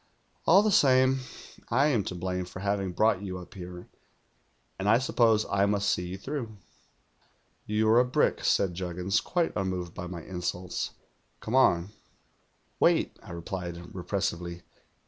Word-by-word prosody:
All 190 +5 +7
the 215 - +2
same, 130 -4 +4 0.5
I 140 +6 +3
am 115 -8 +1
to 90 - -4
blame 90 +1 -3
for 95 +1 -9
having 100 -2 -1
brought 105 +1 +2
you 95 -2 -5
up 90 +1 -11
here, 90 -2 -9 0.9
and 100 +2 0
I 115 - +6
suppose 115 -4 +3
I 100 0 +2
must 100 0 +1
see 90 - -1
you 90 +2 -5
through.' 115 -1 -5 1.1
'"You're 110 +2 +4
a - - +6
brick,' 125 - +1
said 95 -3 +2
Juggins, 90 +3 -1
quite 175 -2 0
unn:oved 90 -3 -2
by 90 - -6
my 85 -2 -7
insults. 90 0 -4 0.4
'Come 110 - -6
on.' 95 -8 +4 0.9
"'Wait,' - - +2
I - - -14
replied 85 +1 -5 0.2
repressively. 90 -2 -3
95 Hz, 145 wpm, -28 LUFS, 90-115 Hz, 1.1 s, All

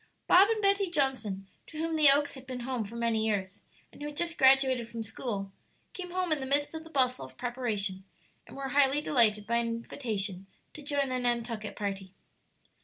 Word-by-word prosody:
Bob 385 +4 +6
and 440 -2 0
Betty 395 -1 +3
Johnson, 260 - -1 0.2
to 310 - -11
whom 325 +1 -2
the 305 -2 +8
Oaks 290 +1 +3
had 265 -1 -11
been 255 -1 -5
home 245 -2 -3
for 215 +4 -10
many 230 -2 0
years, 200 -3 -2 0.3
and - - -16
who 295 - -4
had 295 0 -8
just 335 -1 -1
graduated 265 -3 +4
from 230 -1 -5
school, 205 -3 -5 0.4
came 360 -1 -7
home 365 -1 -2
in 310 - +2
the 265 - -5
midst 285 +3 +1
of 320 0 -6
the 325 - -13
bustle 255 -4 +1
of - - -12
preparation, 225 -6 -2 0.4
and - - -12
were 275 -1 -4
highly 280 +1 +4
delighted 220 -8 +3
by 235 +2 +1
an 235 0 0
invitation 215 -5 -3 0.3
to 305 - -10
join 285 -2 -1
the 255 0 -1
Nantucket 235 -3 -2
party. 195 -2 -5
255 Hz, 200 wpm, -29 LUFS, 220-290 Hz, 0.4 s, the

